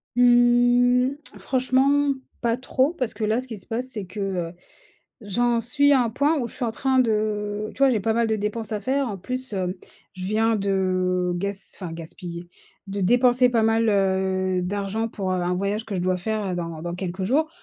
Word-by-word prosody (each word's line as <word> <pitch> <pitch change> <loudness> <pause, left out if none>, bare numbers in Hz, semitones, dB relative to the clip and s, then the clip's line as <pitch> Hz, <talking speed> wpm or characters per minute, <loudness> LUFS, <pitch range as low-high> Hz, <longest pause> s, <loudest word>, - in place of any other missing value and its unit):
Mmh, 245 +1 +4 0.3
franchement, 270 +2 +2 0.3
pas 235 0 +1
trop 260 +3 0
parce 255 -8 -3
que 220 - -5
là, 220 +3 +1
ce 255 - -9
qui 225 -3 -6
se 190 - -9
passe 240 +3 -3
c'est 220 -6 -5
que, 200 +4 -9
heu, 185 -4 -2 0.7
j'en 235 +3 +1
suis 285 +5 +3
à 265 -3 +5
un 235 - -1
point 290 +7 +1
où 240 -3 -2
je - - -8
suis 255 - -2
en 230 - -1
train 265 +2 +1
de 215 -2 0
tu - - -13
vois, 275 -1 +5
j'ai 225 -4 +1
pas 220 +3 +1
mal 230 +1 +2
de 220 - +1
dépenses 210 +1 -3
à 210 - -2
faire 265 +4 0
en 205 - -4
plus, 255 +5 -4
hem, 185 -2 -2 0.4
je 185 - -6
viens 220 +3 +2
de 185 -2 0
gas 200 +2 -2
enfin 180 -4 -6
gaspiller, 170 +1 -8 0.4
de 200 +1 -3
dépenser 245 +5 +4
pas 230 -2 +2
mal, 225 +1 +2
heu, 190 -2 +1
d'argent 200 +4 -2
pour, 195 -4 -4
heu, - - +1
un 180 0 0
voyage 200 +4 -2
que 220 - -6
je 185 - -1
dois 185 +1 +1
faire, 215 +3 -2
heu, - - -2
dans 165 -2 -5
dans 175 0 -4
quelques 185 +1 -4
jours, 290 +10 +2
215 Hz, 210 wpm, -24 LUFS, 190-245 Hz, 0.7 s, à